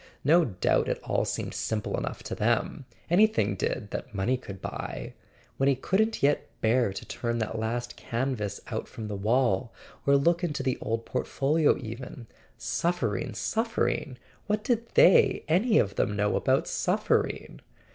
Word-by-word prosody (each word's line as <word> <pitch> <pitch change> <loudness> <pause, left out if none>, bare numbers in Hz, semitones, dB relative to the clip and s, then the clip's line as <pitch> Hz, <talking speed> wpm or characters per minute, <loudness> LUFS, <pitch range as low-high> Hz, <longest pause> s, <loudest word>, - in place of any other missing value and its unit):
No 165 +4 +5
doubt 95 -9 +1
it - - -1
all - - 0
seemed - - -3
simple 105 -2 -2
enough - - -4
to - - -5
them: - - 0 0.2
anything 215 +6 +3
did, 105 -5 -3
that 120 -4 -6
money 100 +7 +1
could 100 -7 -8
buy... - - -6 0.4
When 135 +1 +3
he 140 - +3
couldn't 210 - 0
yet 145 +1 +2
bear 115 -1 +2
to 95 - -7
turn 115 -1 -3
that 110 0 -2
last 120 +2 -3
canvas 115 -5 -2
out 110 - -3
from 110 -2 -7
the 105 - -3
wall, 115 +1 +1 0.4
or 140 0 +6
look 170 +5 +2
into 150 -5 -1
the 130 -2 -1
old 115 +1 -2
port¬ - - -2
folio 150 +3 +2
even... 120 +1 -8 0.3
Suffering, 125 - -1
suffering! 220 - -1 0.3
What 210 0 0
did 235 -2 0
they - - +6
any 210 +8 +3
of 100 - +2
them 105 - 0
know 105 0 +1
about - - +2
suffering? - - 0
125 Hz, 160 wpm, -28 LUFS, 110-165 Hz, 0.4 s, or